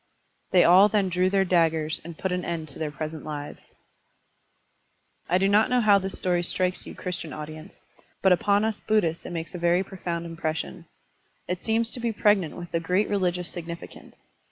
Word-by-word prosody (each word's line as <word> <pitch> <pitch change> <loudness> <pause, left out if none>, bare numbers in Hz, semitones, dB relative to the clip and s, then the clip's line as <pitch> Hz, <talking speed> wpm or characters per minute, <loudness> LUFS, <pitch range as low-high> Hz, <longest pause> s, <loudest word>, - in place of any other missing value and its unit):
They 180 - +5
all 185 +4 +7
then 200 -2 +1
drew 180 +1 +2
their 195 0 +2
daggers 160 -3 +1
and 165 -1 -9
put 190 - -2
an 180 0 -1
end 160 -2 -4
to 140 - -12
their 155 -1 -2
present 155 +1 -6
lives. 145 -1 -8 1.5
I 180 - +4
do 195 +1 +2
not 210 +4 +4
know 250 0 +3
how 210 -3 +5
this 190 0 -5
story 180 -1 +1
strikes 180 +1 0
you - - -8
Christian 180 -3 -5
audience, 155 +4 -9 0.4
but 190 - +5
upon 200 +4 +2
us 220 -1 -2
Buddhists 175 -7 0
it - - -7
makes 165 -1 -5
a 180 - -5
very 175 +2 +2
profound 175 -3 -5
impression. 160 - -4 0.6
It 180 0 -3
seems 225 +1 0
to - - -5
be 235 -1 -1
pregnant 205 -6 +2
with 175 -1 -9
a 165 - +2
great 180 +5 0
religious 180 -3 0
significance. 170 -1 -9
180 Hz, 185 wpm, -26 LUFS, 165-195 Hz, 1.5 s, all